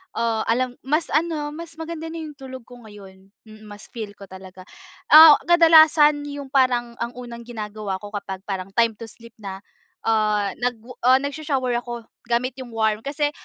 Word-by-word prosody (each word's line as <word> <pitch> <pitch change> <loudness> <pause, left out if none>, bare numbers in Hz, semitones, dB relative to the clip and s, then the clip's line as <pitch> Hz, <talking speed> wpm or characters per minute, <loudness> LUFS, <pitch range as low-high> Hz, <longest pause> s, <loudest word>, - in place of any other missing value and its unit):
ah, 230 -1 0
alam 250 +2 -1
mas 305 +4 0
ano, 305 -1 -1
mas 330 +2 -10
maganda 325 0 -6
na 325 - -8
yung 300 -1 -9
tulog 260 -2 -9
ko 245 +1 -15
ngayon. 195 -3 -15 0.2
Mm, 215 -1 -15
mas 205 0 -12
feel 215 -3 -7
ko 200 - -14
talaga. 185 0 -12 0.5
Ah, 310 -1 +11
kadalasan 315 -3 +5
yung 285 -1 -7
parang 250 -3 +1
ang 235 0 -3
unang 240 -1 -9
ginagawa 215 -4 -6
ko 205 - -9
kapag 200 -2 -6
parang 195 -1 -5
time 230 -2 +2
to 230 - -8
sleep 230 +1 -16
na, 195 -1 -8 0.4
ah, 210 -2 +1
nag 245 0 -1 0.3
ah, 255 - +7
nagsho-shower 280 -3 -2
ako 240 -1 -7 0.2
gamit 240 +2 0
yung 240 -3 -9
warm, 220 -1 +1
kasi 290 +3 -2
240 Hz, 175 wpm, -22 LUFS, 215-290 Hz, 0.5 s, Ah